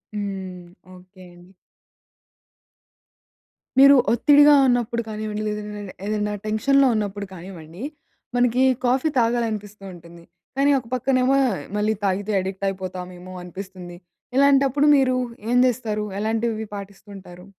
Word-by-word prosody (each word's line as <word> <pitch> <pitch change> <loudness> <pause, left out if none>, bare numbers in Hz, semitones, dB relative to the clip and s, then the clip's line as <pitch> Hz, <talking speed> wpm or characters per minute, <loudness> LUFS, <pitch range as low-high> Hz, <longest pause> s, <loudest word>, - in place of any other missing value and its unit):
హ్మ్. 190 -3 -5 0.3
ఓకే 185 +1 -17
అండి. 175 +2 -18 2.3
మీరు 275 +1 +8 0.2
ఒత్తిడిగా 290 +4 +6
ఉన్నప్పుడు 240 -1 0
కానివ్వండి, 215 0 -4
లేదంటే 210 -2 -6
ఏదైనా 210 0 -2
టెన్షన్‌లో 270 +6 +3
ఉన్నప్పుడు 205 -1 -3
కానివ్వండి, 175 +2 -10 0.5
మనకి 245 +1 +2 0.2
కాఫీ 260 +5 +2
తాగాలనిపిస్తుంటుంది. 205 -7 -3 0.3
కానీ, 285 +1 +3
ఒక 250 - -14
పక్కనేమో 255 +1 +2 0.4
మళ్ళీ 210 +1 +1
తాగితే 200 +2 -1
అడిక్ట్ 190 +1 -5
అయిపోతామేమో 185 -1 -7
అనిపిస్తుంది. 180 -1 -9 0.4
ఇలాంటప్పుడు 280 0 +4
మీరు 255 -1 +2 0.4
ఏం 245 - +3
జేస్తారు? 220 -4 -2
ఎలాంటివి 220 0 -1
పాటిస్తుంటారు? 195 -2 -11
210 Hz, 100 wpm, -22 LUFS, 190-245 Hz, 2.3 s, మీరు